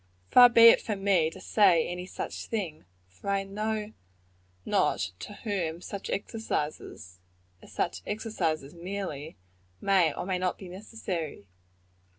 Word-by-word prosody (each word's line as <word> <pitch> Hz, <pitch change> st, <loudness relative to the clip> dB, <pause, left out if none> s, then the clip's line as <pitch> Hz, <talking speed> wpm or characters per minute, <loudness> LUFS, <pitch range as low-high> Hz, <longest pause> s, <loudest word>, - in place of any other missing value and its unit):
Far 245 Hz, -1 st, +9 dB
be 230 Hz, -1 st, +9 dB
it -, -, +5 dB
from 205 Hz, -3 st, -4 dB
me 180 Hz, -6 st, +3 dB
to 175 Hz, -, -12 dB
say 185 Hz, -4 st, +4 dB
any 180 Hz, +1 st, -5 dB
such -, -, -6 dB
thing; 180 Hz, -, -4 dB, 0.2 s
for 90 Hz, -, -9 dB
I 195 Hz, 0 st, +1 dB
know 215 Hz, +2 st, -3 dB, 0.7 s
not 90 Hz, -, +1 dB
to -, -, -8 dB
whom 175 Hz, -6 st, -2 dB
such 195 Hz, +2 st, -7 dB
exercises, 150 Hz, -, -4 dB, 0.4 s
as -, -, -15 dB
such -, -, -2 dB
exercises 185 Hz, -9 st, -2 dB
merely, 170 Hz, -, -6 dB, 0.4 s
may 185 Hz, -5 st, +3 dB
or -, -, -5 dB
may 185 Hz, -1 st, -1 dB
not 180 Hz, 0 st, -1 dB
be 190 Hz, -, -10 dB
necessary. 180 Hz, -, -5 dB
190 Hz, 140 wpm, -28 LUFS, 160-210 Hz, 0.7 s, Far